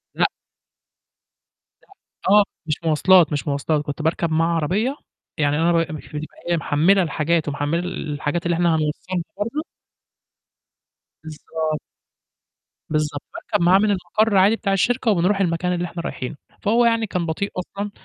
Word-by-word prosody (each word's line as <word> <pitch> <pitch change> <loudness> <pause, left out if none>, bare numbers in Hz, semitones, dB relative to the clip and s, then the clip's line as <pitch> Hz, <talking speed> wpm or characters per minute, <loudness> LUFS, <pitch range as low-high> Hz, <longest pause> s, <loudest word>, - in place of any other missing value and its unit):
لأ. - - +3 1.6
لأ، - - -28 0.5
آه، 210 - +7 0.2
مش 155 -2 0
مواصلات، 165 +2 +5
مش 145 - -2
مواصلات 145 +2 0
كنت 145 +1 -4
باركب 160 +1 0
معاه 165 +1 +2
عربية، 205 - 0 0.4
يعني 145 -1 +1
أنا 170 +1 +3
ب 165 -1 +1
مش 155 - -8
بتبقى 150 +1 -7
إيه، 170 - +2
محمّلة 170 +6 +3
الحاجات 160 0 0
ومحمّلة 145 +3 -1
ال 170 -4 -4
الحاجات 150 +4 -2
اللي 170 -1 +1
إحنا 175 0 +2
هنوصّلها 160 +3 -2
برضه. 230 +10 -2 1.6
بالضبط. 155 0 -4 1.1
بالضبط، 150 -2 -1
باركب - - -2
معاه 185 +2 +6
من 210 0 +2
المَقَرّ 200 +3 +1
عادي 200 +4 +5
بتاع 200 -3 -1
الشركة، 235 +3 +2
وبنرُوح 195 +2 +2
المكان 180 0 0
اللي 175 0 -1
إحنا 170 0 -6
رايحينه، 130 +4 -5 0.3
فهو 235 +3 +3
يعني 230 -1 +2
كان 180 -2 -2
بطيء 200 +5 -2
أصلًا، 200 +3 -4
170 Hz, 150 wpm, -22 LUFS, 155-195 Hz, 1.6 s, آه